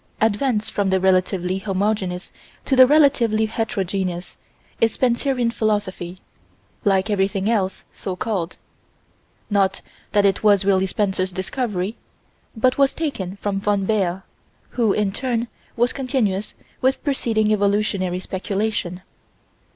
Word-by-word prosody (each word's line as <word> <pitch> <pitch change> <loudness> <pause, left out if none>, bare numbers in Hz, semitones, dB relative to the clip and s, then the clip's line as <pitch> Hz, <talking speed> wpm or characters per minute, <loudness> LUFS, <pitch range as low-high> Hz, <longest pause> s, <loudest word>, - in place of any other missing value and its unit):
Advance 220 +1 +1
from 200 -1 -1
the 190 0 +2
relatively 185 0 +1
homogeneous 195 -2 -1 0.3
to 270 - +2
the 255 0 +8
relatively 255 -7 +4
heterogeneous 190 -5 -2 0.4
is 230 - +3
Spencerian 245 -1 +1
Philosophy 205 -5 -2 0.7
like 195 -1 +2
everything 195 0 0
else, 200 -5 0
so 190 - -5
called: 185 -4 -3 0.9
not 195 -1 +2 0.3
that 205 -1 +4
it 195 - +2
was 205 -3 +4
really 190 -1 +3
Spencer's 190 -1 0
discovery, 200 +1 -3 0.6
but 255 +4 +2
was 275 -1 +3
taken 205 - -3
from 200 -1 -2
von 200 -1 +1
Baer, 190 -3 0 0.5
who, 230 -4 +1
in 205 -1 +1
turn, 240 +2 -1 0.3
was 240 +1 +2
continuous 235 -7 -1 0.3
with 260 +1 +1
preceding 225 -6 +1
evolutionary 200 -3 +1
speculation. 190 -1 -3
205 Hz, 120 wpm, -22 LUFS, 190-230 Hz, 0.9 s, the